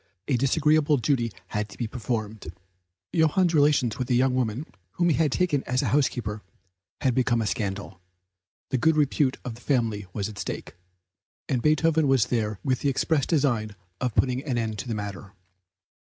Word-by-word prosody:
A 135 Hz, -, +2 dB
disagreeable 150 Hz, +3 st, +3 dB
duty 120 Hz, -1 st, 0 dB, 0.2 s
had 105 Hz, -1 st, -2 dB
to 100 Hz, -, -13 dB
be 120 Hz, -, -2 dB
performed; 110 Hz, -5 st, -4 dB, 0.6 s
Johann's 170 Hz, +2 st, +3 dB
relations 145 Hz, -6 st, +3 dB
with 125 Hz, 0 st, -2 dB
a 125 Hz, -, +3 dB
young 130 Hz, +1 st, +3 dB
woman, 125 Hz, +2 st, -1 dB, 0.3 s
whom 175 Hz, 0 st, +2 dB
he 155 Hz, -, +3 dB
had 155 Hz, -4 st, +2 dB
taken 150 Hz, -3 st, +1 dB
as 125 Hz, +1 st, 0 dB
housekeeper, 120 Hz, -7 st, 0 dB, 0.6 s
had 130 Hz, -, +2 dB
become 120 Hz, -1 st, +2 dB
a 110 Hz, -, 0 dB
scandal; 95 Hz, -1 st, -3 dB, 0.7 s
the 130 Hz, -, +1 dB
good 160 Hz, +3 st, +3 dB
repute 140 Hz, -2 st, +2 dB
of 125 Hz, -, -4 dB
the 120 Hz, -, -14 dB
family 115 Hz, -8 st, 0 dB
was 100 Hz, +1 st, -3 dB
at 105 Hz, -1 st, -9 dB
stake, -, -, -5 dB, 0.7 s
and 125 Hz, -3 st, 0 dB
Beethoven 155 Hz, +1 st, +3 dB
went 135 Hz, -4 st, +3 dB
there 110 Hz, -4 st, 0 dB
with 130 Hz, -3 st, +1 dB
the 140 Hz, -, +1 dB
express 140 Hz, +2 st, +1 dB
design 120 Hz, -9 st, +1 dB, 0.2 s
of 125 Hz, -4 st, -2 dB
putting 130 Hz, 0 st, +1 dB
an 135 Hz, -5 st, -2 dB
end 110 Hz, -2 st, -2 dB
to -, -, -5 dB
the 115 Hz, -, -2 dB
matter. 100 Hz, -1 st, -6 dB
125 Hz, 175 wpm, -26 LUFS, 110-145 Hz, 0.7 s, disagreeable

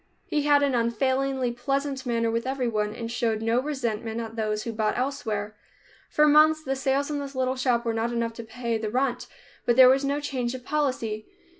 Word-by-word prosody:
He 300 Hz, -, 0 dB
had 290 Hz, -1 st, +5 dB
an 280 Hz, -2 st, +2 dB
unfailingly 260 Hz, +2 st, 0 dB
pleasant 275 Hz, +2 st, -2 dB
manner 230 Hz, -1 st, +1 dB
with 230 Hz, +2 st, -2 dB
everyone, 230 Hz, -6 st, -1 dB
and 230 Hz, -1 st, -5 dB
showed 225 Hz, -2 st, -1 dB
no 230 Hz, +2 st, +2 dB
resentment 235 Hz, -6 st, -3 dB
at 225 Hz, -1 st, -6 dB
those 215 Hz, -1 st, -1 dB
who 230 Hz, -, -3 dB
bought 215 Hz, -1 st, 0 dB
elsewhere. 220 Hz, -6 st, -2 dB, 0.5 s
For 300 Hz, -, +4 dB
months 310 Hz, +1 st, +5 dB
the 270 Hz, -1 st, -1 dB
sales 270 Hz, +2 st, 0 dB
in 290 Hz, -, -1 dB
this 280 Hz, -1 st, -6 dB
little 260 Hz, 0 st, 0 dB
shop 250 Hz, -2 st, +1 dB
were 230 Hz, -, 0 dB
not 225 Hz, +1 st, -1 dB
enough 230 Hz, -1 st, -1 dB
to 230 Hz, -, -8 dB
pay 230 Hz, 0 st, -3 dB
the 215 Hz, -1 st, -3 dB
rent, 255 Hz, +2 st, -1 dB, 0.4 s
but 240 Hz, -, +2 dB
there 255 Hz, 0 st, +9 dB
was 270 Hz, +2 st, +3 dB
no 280 Hz, +1 st, 0 dB
change 260 Hz, -4 st, -2 dB
of 250 Hz, -1 st, -9 dB
policy. 255 Hz, -8 st, -1 dB
245 Hz, 200 wpm, -26 LUFS, 230-275 Hz, 0.5 s, there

